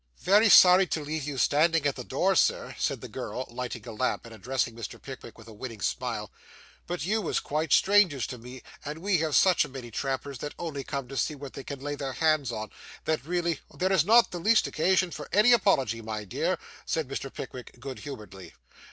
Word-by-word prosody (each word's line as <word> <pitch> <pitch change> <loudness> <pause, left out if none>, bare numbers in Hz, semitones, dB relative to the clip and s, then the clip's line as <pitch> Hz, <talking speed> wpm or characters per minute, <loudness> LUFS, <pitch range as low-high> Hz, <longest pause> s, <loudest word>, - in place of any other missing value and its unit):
'Very 210 +4 +5
sorry 185 0 +8
to 160 - -1
leave 155 -1 -3
you 145 -2 -4
standing 155 +3 +3
at 145 - +1
the - - -6
door, - - +1
Sir,' - - +2
said - - -1
the - - -7
girl, 130 - -5
lighting 120 -1 -6
a - - -5
lamp, 120 +3 -1
and 115 - -11
addressing 115 +2 -2
Mr. 115 - -7
Pickwick 130 -4 -10
with 115 -1 -14
a 110 - -11
winning 115 0 -7
smile, - - -3 0.6
'but 175 -4 -3
you 215 +4 +1
was 175 - 0
quite 155 0 -2
strangers 190 -10 +4
to 125 - -7
me; 125 +2 -11 0.2
and 150 +2 -5
we 185 +1 +1
have 155 -2 0
such 185 -4 +5
a - - -7
many 130 -3 -8
trampers 135 +2 -3
that 145 - -6
only 150 -5 -4
come 140 -1 -4
to 135 - -8
see 150 - 0
what 140 -1 -9
they 135 - -7
can 140 -1 -7
lay 145 +1 -3
their 140 -2 -4
hands 155 -4 +2
on, 110 -2 -5 0.3
that 160 -4 0
really 170 0 -1
' - - -23
'There 185 +1 +1
is 180 -6 +4
not 230 +5 +5
the 175 - -4
least 215 +5 +4
occasion 185 +2 +1
for - - -7
any 215 +5 +6
apology, 135 - +2
my 110 -1 -5
dear,' 100 - -1 0.3
said 160 -4 -2
Mr. 135 0 -5
Pickwick 125 -1 -9
good 130 +1 -7
humouredly. 105 - -9
140 Hz, 220 wpm, -28 LUFS, 125-170 Hz, 0.6 s, sorry